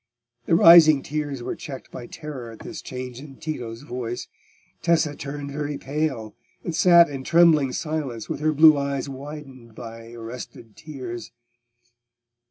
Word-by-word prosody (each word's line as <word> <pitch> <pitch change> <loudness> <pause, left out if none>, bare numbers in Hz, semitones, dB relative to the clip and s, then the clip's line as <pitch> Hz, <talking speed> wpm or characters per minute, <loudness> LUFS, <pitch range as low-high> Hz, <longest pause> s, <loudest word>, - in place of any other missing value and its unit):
The 165 - +4
rising 165 -4 +8
tears 145 -4 -4
were - - -4
checked 145 -5 -9
by 120 - -8
terror 135 -6 -8
at 115 - -12
this 170 -3 -8
change 125 -1 -7
in 140 -1 -11
Tito's 125 -7 -6
voice. 120 -3 -5 0.5
Tessa 160 -3 +2
turned 140 0 -6
very 145 0 -3
pale, 135 -7 -3 0.3
and 170 - -3
sat 170 -1 +7
in 135 -2 -6
trembling 160 -4 +4
silence, 150 - -4
with - - -4
her 155 +1 +1
blue 155 0 +6
eyes 140 0 -2
widened 135 -4 -10
by 115 -1 -10
arrested 115 -1 -9
tears. 130 -6 -8
140 Hz, 145 wpm, -24 LUFS, 125-155 Hz, 0.5 s, rising